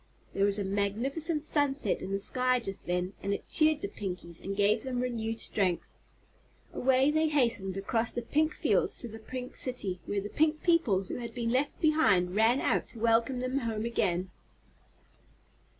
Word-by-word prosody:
There 195 Hz, -, +2 dB
was 200 Hz, 0 st, +3 dB
a 205 Hz, -, -1 dB
magnificent 250 Hz, -, 0 dB
sunset 290 Hz, -3 st, +1 dB
in -, -, -6 dB
the 195 Hz, 0 st, -1 dB
sky 255 Hz, +4 st, +1 dB
just 195 Hz, -5 st, -3 dB
then 180 Hz, +2 st, -1 dB
and 200 Hz, 0 st, -1 dB
it -, -, -9 dB
cheered 310 Hz, -1 st, +3 dB
the -, -, -2 dB
Pinkies 180 Hz, -4 st, -7 dB
and 195 Hz, +1 st, -4 dB
gave 210 Hz, +2 st, +3 dB
them 255 Hz, 0 st, -3 dB
renewed 225 Hz, -2 st, -3 dB
strength. 185 Hz, -5 st, -2 dB, 0.7 s
Away 265 Hz, +2 st, +3 dB
they 315 Hz, +1 st, +2 dB
hastened 235 Hz, -10 st, +2 dB
across 225 Hz, +4 st, 0 dB
the 240 Hz, -, -4 dB
pink 310 Hz, +6 st, 0 dB
fields -, -, +1 dB
to 240 Hz, -, -6 dB
the 225 Hz, 0 st, -10 dB
Pink 250 Hz, +2 st, -7 dB
City, 205 Hz, -8 st, -1 dB
where 205 Hz, -, -2 dB
all 200 Hz, -, -1 dB
the 205 Hz, -, -5 dB
Pink 310 Hz, +5 st, +1 dB
people 330 Hz, -, +2 dB
who 185 Hz, -, -6 dB
had 235 Hz, -2 st, -7 dB
been 230 Hz, -1 st, -1 dB
left 270 Hz, +4 st, 0 dB
behind 200 Hz, -, +3 dB
ran 225 Hz, +5 st, +3 dB
out -, -, 0 dB
to 230 Hz, -, -11 dB
welcome 230 Hz, +3 st, +2 dB
them 255 Hz, +2 st, -1 dB
home 225 Hz, -3 st, -3 dB
again. 185 Hz, -6 st, -1 dB
230 Hz, 180 wpm, -29 LUFS, 200-265 Hz, 0.7 s, was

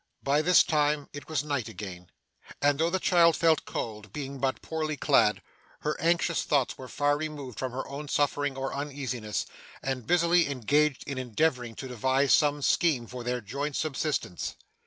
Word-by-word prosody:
By 140 Hz, +2 st, +3 dB
this 180 Hz, +3 st, +6 dB
time 150 Hz, -3 st, +1 dB
it 145 Hz, +1 st, -9 dB
was 150 Hz, -3 st, 0 dB
night 140 Hz, -6 st, -2 dB
again, 90 Hz, -2 st, -8 dB, 0.5 s
and 145 Hz, 0 st, +2 dB
though 165 Hz, +1 st, +3 dB
the 190 Hz, -, +1 dB
child 170 Hz, -3 st, +4 dB
felt 165 Hz, -1 st, +3 dB
cold, 105 Hz, -3 st, -5 dB
being 140 Hz, +2 st, -6 dB
but 135 Hz, 0 st, -1 dB
poorly 155 Hz, -2 st, -2 dB
clad, -, -, +3 dB, 0.4 s
her 150 Hz, 0 st, -1 dB
anxious 170 Hz, 0 st, +2 dB
thoughts 140 Hz, -4 st, +1 dB
were 130 Hz, -, -9 dB
far 145 Hz, +2 st, +1 dB
removed 145 Hz, -6 st, -6 dB
from 130 Hz, -1 st, -2 dB
her 130 Hz, +2 st, -4 dB
own 140 Hz, +2 st, -6 dB
suffering 145 Hz, -1 st, 0 dB
or 135 Hz, 0 st, -3 dB
uneasiness, 130 Hz, -6 st, -3 dB, 0.4 s
and 130 Hz, -4 st, -3 dB
busily 175 Hz, -2 st, +4 dB
engaged 140 Hz, +2 st, +1 dB
in 140 Hz, -2 st, -4 dB
endeavouring 125 Hz, -1 st, 0 dB
to 130 Hz, -, -6 dB
devise 130 Hz, +3 st, +2 dB
some 145 Hz, -1 st, +3 dB
scheme 145 Hz, -8 st, +2 dB
for 125 Hz, +1 st, -7 dB
their 125 Hz, 0 st, -2 dB
joint 140 Hz, +7 st, -4 dB
subsistence. 150 Hz, -, -2 dB
140 Hz, 170 wpm, -28 LUFS, 130-150 Hz, 0.5 s, this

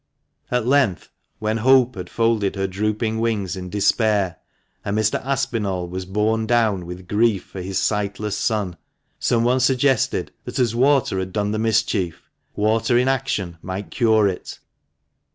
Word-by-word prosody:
At 125 Hz, -2 st, 0 dB
length, 130 Hz, -8 st, +1 dB, 0.3 s
when 110 Hz, +1 st, -1 dB
Hope 130 Hz, +1 st, +4 dB
had 90 Hz, -3 st, -7 dB
folded 115 Hz, -4 st, +1 dB
her 95 Hz, 0 st, -1 dB
drooping 105 Hz, +3 st, -1 dB
wings 105 Hz, -6 st, -1 dB
in 90 Hz, -1 st, -6 dB
despair, 105 Hz, -2 st, +1 dB, 0.5 s
and 100 Hz, +1 st, -2 dB
Mr. 110 Hz, 0 st, +1 dB
Aspinall 105 Hz, -9 st, -1 dB
was 90 Hz, +1 st, -6 dB
borne 110 Hz, +3 st, 0 dB
down 110 Hz, -7 st, +1 dB
with 90 Hz, +1 st, -8 dB
grief 105 Hz, -1 st, +2 dB
for 95 Hz, -, -9 dB
his 95 Hz, +1 st, -3 dB
sightless 105 Hz, 0 st, -1 dB
son, 105 Hz, -6 st, -1 dB, 0.4 s
someone 120 Hz, +2 st, +2 dB
suggested 130 Hz, 0 st, +1 dB
that, -, -, -6 dB
as 120 Hz, -3 st, +2 dB
water 130 Hz, -5 st, +2 dB
had 95 Hz, 0 st, -4 dB
done 105 Hz, +1 st, -1 dB
the 110 Hz, -, -1 dB
mischief, 110 Hz, -6 st, 0 dB, 0.2 s
water 110 Hz, +3 st, +2 dB
in 125 Hz, +1 st, +2 dB
action 115 Hz, -11 st, -1 dB
might 95 Hz, +2 st, -6 dB
cure 110 Hz, -4 st, +3 dB
it. 95 Hz, -2 st, -5 dB
110 Hz, 150 wpm, -22 LUFS, 95-115 Hz, 0.5 s, Hope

